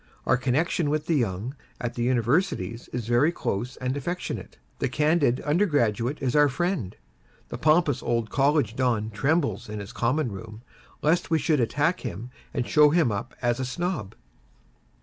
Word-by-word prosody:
Our -, -, +4 dB
connexion 145 Hz, +5 st, 0 dB
with 155 Hz, +1 st, -1 dB
the 165 Hz, -, +1 dB
youth 110 Hz, +1 st, -2 dB, 0.3 s
at 120 Hz, 0 st, -3 dB
the 120 Hz, -, -4 dB
Universities 120 Hz, -, 0 dB
is 120 Hz, -2 st, -3 dB
very 120 Hz, +7 st, +4 dB
close 120 Hz, -, -3 dB
and 130 Hz, +1 st, -2 dB
affectionate. 175 Hz, +6 st, -4 dB, 0.2 s
The -, -, 0 dB
candid 150 Hz, -4 st, +2 dB
undergraduate 145 Hz, -, +1 dB
is 130 Hz, 0 st, 0 dB
our 145 Hz, -1 st, +6 dB
friend. 150 Hz, -, -2 dB, 0.5 s
The 120 Hz, -, -6 dB
pompous 155 Hz, -2 st, +3 dB
old 115 Hz, -2 st, -1 dB
College 140 Hz, -5 st, +2 dB
Don 115 Hz, -4 st, 0 dB
trembles 140 Hz, +5 st, 0 dB
in 105 Hz, 0 st, -5 dB
his 100 Hz, -1 st, -8 dB
common 125 Hz, +1 st, 0 dB
room, 110 Hz, +3 st, -9 dB, 0.4 s
lest 165 Hz, +4 st, +2 dB
we 165 Hz, -, +3 dB
should 150 Hz, 0 st, +1 dB
attack 150 Hz, +9 st, +1 dB
him 115 Hz, +8 st, -6 dB, 0.2 s
and 125 Hz, -4 st, -2 dB
show 150 Hz, -1 st, +6 dB
him 155 Hz, -6 st, +3 dB
up 100 Hz, -, -4 dB
as 120 Hz, 0 st, +1 dB
a -, -, -1 dB
Snob. 125 Hz, -, -3 dB
130 Hz, 165 wpm, -26 LUFS, 115-155 Hz, 0.5 s, our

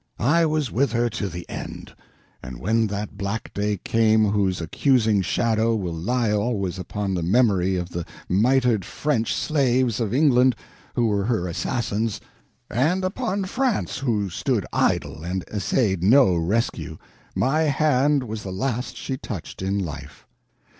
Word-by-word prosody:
I 165 Hz, +7 st, +3 dB
was 155 Hz, -5 st, -1 dB
with 130 Hz, 0 st, +1 dB
her 120 Hz, 0 st, +1 dB
to 100 Hz, -1 st, -3 dB
the 85 Hz, 0 st, -8 dB
end; -, -, -7 dB, 0.5 s
and 65 Hz, -, -8 dB
when 110 Hz, +3 st, +1 dB
that 100 Hz, 0 st, -5 dB
black 100 Hz, +3 st, -4 dB
day 105 Hz, 0 st, -1 dB
came 110 Hz, +2 st, +3 dB
whose 95 Hz, -3 st, +1 dB
accusing 110 Hz, -, +2 dB
shadow 115 Hz, +3 st, +1 dB
will 90 Hz, -6 st, -3 dB
lie 110 Hz, +7 st, 0 dB
always 100 Hz, -4 st, -1 dB
upon 100 Hz, +1 st, -3 dB
the 90 Hz, -, -1 dB
memory 95 Hz, -1 st, +2 dB
of 90 Hz, -1 st, -3 dB
the 85 Hz, -1 st, -4 dB, 0.2 s
mitered 120 Hz, +1 st, +2 dB
French 120 Hz, -, -1 dB
slaves 130 Hz, -6 st, +1 dB
of 110 Hz, -4 st, -1 dB
England 130 Hz, -2 st, +4 dB, 0.4 s
who 120 Hz, -, +2 dB
were 100 Hz, -3 st, +1 dB
her 110 Hz, -6 st, 0 dB
assassins, 110 Hz, +4 st, -2 dB, 0.5 s
and 155 Hz, -, +1 dB
upon 195 Hz, +1 st, -2 dB
France 245 Hz, -, -1 dB
who 105 Hz, -8 st, -1 dB
stood -, -, -1 dB
idle 80 Hz, -, 0 dB
and 90 Hz, +1 st, -3 dB
essayed 100 Hz, -2 st, 0 dB
no 110 Hz, +1 st, +5 dB
rescue, 85 Hz, -2 st, -1 dB, 0.4 s
my 155 Hz, +5 st, +2 dB
hand 145 Hz, -1 st, +2 dB
was 110 Hz, -2 st, -5 dB
the 95 Hz, -, -6 dB
last 125 Hz, +5 st, -3 dB
she 130 Hz, -, -4 dB
touched 100 Hz, -10 st, -7 dB
in 95 Hz, +1 st, -1 dB
life. 85 Hz, -7 st, -6 dB
110 Hz, 150 wpm, -23 LUFS, 95-130 Hz, 0.5 s, no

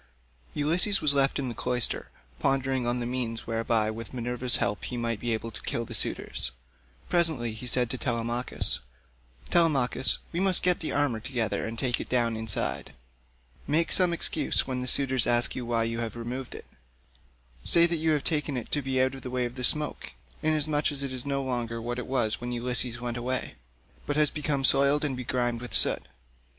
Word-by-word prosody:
Ulysses 175 Hz, +7 st, +3 dB
was 150 Hz, -2 st, +2 dB
left 135 Hz, -1 st, +2 dB
in 140 Hz, -, -2 dB
the 120 Hz, -, -4 dB
cloister, 125 Hz, 0 st, 0 dB, 0.3 s
pondering 135 Hz, -2 st, 0 dB
on 120 Hz, +1 st, 0 dB
the 120 Hz, -, -3 dB
means 120 Hz, -2 st, -3 dB
whereby 115 Hz, -1 st, 0 dB
with 115 Hz, +2 st, -8 dB
Minerva's 125 Hz, 0 st, +1 dB
help 100 Hz, 0 st, -1 dB
he 125 Hz, -, -5 dB
might 115 Hz, -2 st, -2 dB
be 120 Hz, +1 st, -2 dB
able 115 Hz, +1 st, -3 dB
to -, -, -8 dB
kill 115 Hz, -, -3 dB
the -, -, -9 dB
suitors. -, -, -1 dB, 0.6 s
Presently 160 Hz, -10 st, +2 dB
he 110 Hz, +3 st, -7 dB
said 125 Hz, 0 st, +4 dB
to 130 Hz, -, -3 dB
Telemachus, 120 Hz, 0 st, 0 dB, 0.7 s
"Telemachus, 140 Hz, -6 st, +4 dB
we 170 Hz, -, -2 dB
must 190 Hz, -1 st, +2 dB
get 180 Hz, -1 st, +3 dB
the 160 Hz, -, -3 dB
armour 140 Hz, -6 st, 0 dB
together 115 Hz, -2 st, -2 dB
and 115 Hz, +1 st, -6 dB
take 125 Hz, 0 st, 0 dB
it -, -, -8 dB
down 120 Hz, -2 st, +1 dB
inside. 110 Hz, -9 st, -1 dB, 0.7 s
Make 160 Hz, +4 st, +1 dB
some 180 Hz, -2 st, +4 dB
excuse 160 Hz, -3 st, 0 dB
when 130 Hz, -1 st, -3 dB
the 125 Hz, -, -4 dB
suitors 130 Hz, -3 st, +5 dB
ask 120 Hz, 0 st, +2 dB
you 125 Hz, -2 st, -5 dB
why 115 Hz, -1 st, +1 dB
you 115 Hz, 0 st, -3 dB
have 115 Hz, -2 st, -4 dB
removed 120 Hz, +2 st, -6 dB
it. -, -, -10 dB, 1.0 s
Say 170 Hz, -, +5 dB
that 170 Hz, 0 st, +1 dB
you 160 Hz, +1 st, 0 dB
have 145 Hz, -2 st, -1 dB
taken 150 Hz, -4 st, 0 dB
it 120 Hz, -, -6 dB
to 145 Hz, -, +1 dB
be 135 Hz, -1 st, -1 dB
out 130 Hz, 0 st, +2 dB
of 135 Hz, -, -9 dB
the 125 Hz, -, -7 dB
way 125 Hz, 0 st, -1 dB
of 120 Hz, -, -5 dB
the 125 Hz, 0 st, -6 dB
smoke, 150 Hz, +4 st, +1 dB, 0.3 s
inasmuch 155 Hz, -1 st, +1 dB
as 140 Hz, -1 st, 0 dB
it 135 Hz, -1 st, -4 dB
is 130 Hz, +1 st, -5 dB
no 140 Hz, -1 st, -1 dB
longer 120 Hz, -3 st, -3 dB
what 120 Hz, +2 st, -4 dB
it -, -, -6 dB
was 125 Hz, -5 st, 0 dB
when 120 Hz, 0 st, -4 dB
Ulysses 120 Hz, 0 st, 0 dB
went 120 Hz, -1 st, -4 dB
away, 125 Hz, +1 st, -3 dB, 0.5 s
but 145 Hz, -, -1 dB
has 150 Hz, -2 st, +3 dB
become 145 Hz, -2 st, -2 dB
soiled 140 Hz, +3 st, +4 dB
and 135 Hz, -3 st, -2 dB
begrimed 120 Hz, -1 st, -2 dB
with 125 Hz, -4 st, -4 dB
soot. -, -, +3 dB
125 Hz, 200 wpm, -27 LUFS, 120-140 Hz, 1.0 s, suitors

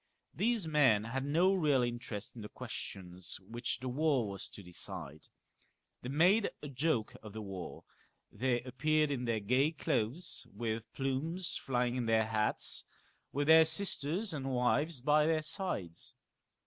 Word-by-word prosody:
These 225 Hz, -5 st, +1 dB
men 135 Hz, -9 st, +4 dB
had 130 Hz, +4 st, -3 dB
no 170 Hz, +7 st, +3 dB
real 150 Hz, -8 st, +3 dB
interest 120 Hz, -3 st, -4 dB
in 115 Hz, -, -8 dB
the 105 Hz, -, -7 dB
questions 90 Hz, -1 st, -7 dB
which 120 Hz, +3 st, -3 dB
the 130 Hz, -, -4 dB
war 135 Hz, -2 st, +1 dB
was 100 Hz, -1 st, -4 dB
to 90 Hz, -4 st, -11 dB
settle. 75 Hz, -3 st, -5 dB, 0.8 s
They 125 Hz, -, -5 dB
made 180 Hz, +10 st, +4 dB
a 145 Hz, -, -5 dB
joke 135 Hz, -4 st, 0 dB
of 110 Hz, -2 st, -10 dB
the 110 Hz, -, -5 dB
war; 95 Hz, -3 st, -7 dB, 0.5 s
they 125 Hz, -1 st, 0 dB
appeared 150 Hz, +4 st, +1 dB
in 125 Hz, -3 st, -2 dB
their 115 Hz, -2 st, +1 dB
gay 125 Hz, +9 st, +2 dB
clothes 145 Hz, +1 st, -2 dB
with 110 Hz, +1 st, -4 dB
plumes 155 Hz, +7 st, -1 dB
flying 125 Hz, -2 st, 0 dB
in 120 Hz, -2 st, -1 dB
their 110 Hz, -1 st, +3 dB
hats, 110 Hz, -1 st, 0 dB, 0.5 s
with 145 Hz, +1 st, 0 dB
their 160 Hz, +1 st, +8 dB
sisters 165 Hz, +2 st, +1 dB
and 135 Hz, -2 st, -3 dB
wives 130 Hz, +3 st, +1 dB
by 150 Hz, +2 st, +4 dB
their 160 Hz, -1 st, +2 dB
sides. 145 Hz, -, -3 dB
130 Hz, 150 wpm, -33 LUFS, 110-155 Hz, 0.8 s, their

